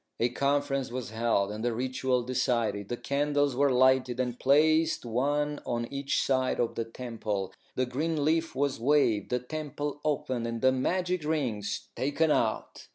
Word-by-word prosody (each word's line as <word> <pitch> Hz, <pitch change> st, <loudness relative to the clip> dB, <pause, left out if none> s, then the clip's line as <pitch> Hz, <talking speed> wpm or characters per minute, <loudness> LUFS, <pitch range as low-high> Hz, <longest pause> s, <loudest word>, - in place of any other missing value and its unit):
A 120 Hz, -, +2 dB
conference 140 Hz, +1 st, 0 dB
was 125 Hz, -2 st, -5 dB
held, 110 Hz, -3 st, +1 dB
and 105 Hz, +1 st, -5 dB
the 120 Hz, -1 st, 0 dB
ritual 130 Hz, 0 st, 0 dB
decided. 115 Hz, -5 st, 0 dB
The 120 Hz, -, -2 dB
candles 145 Hz, 0 st, 0 dB
were 140 Hz, +1 st, +3 dB
lighted, 130 Hz, -1 st, +3 dB
and 125 Hz, -1 st, -2 dB
placed 155 Hz, +2 st, +3 dB
one 145 Hz, +5 st, 0 dB
on 120 Hz, -1 st, -2 dB
each 140 Hz, 0 st, 0 dB
side 130 Hz, -1 st, +1 dB
of 120 Hz, -, 0 dB
the 115 Hz, -, -3 dB
temple. 110 Hz, -5 st, -4 dB, 0.2 s
The 130 Hz, -, +1 dB
green 150 Hz, +4 st, -1 dB
leaf 160 Hz, 0 st, +1 dB
was 140 Hz, -1 st, 0 dB
waved, 120 Hz, -6 st, +2 dB
the 125 Hz, -, +1 dB
temple 145 Hz, +2 st, -5 dB
opened, 130 Hz, -5 st, -1 dB
and 115 Hz, 0 st, -3 dB
the 130 Hz, +3 st, +4 dB
magic 180 Hz, +6 st, 0 dB
rings 130 Hz, -10 st, -2 dB
taken 150 Hz, +4 st, +1 dB
out. 110 Hz, -6 st, -1 dB
130 Hz, 160 wpm, -29 LUFS, 120-145 Hz, 0.2 s, the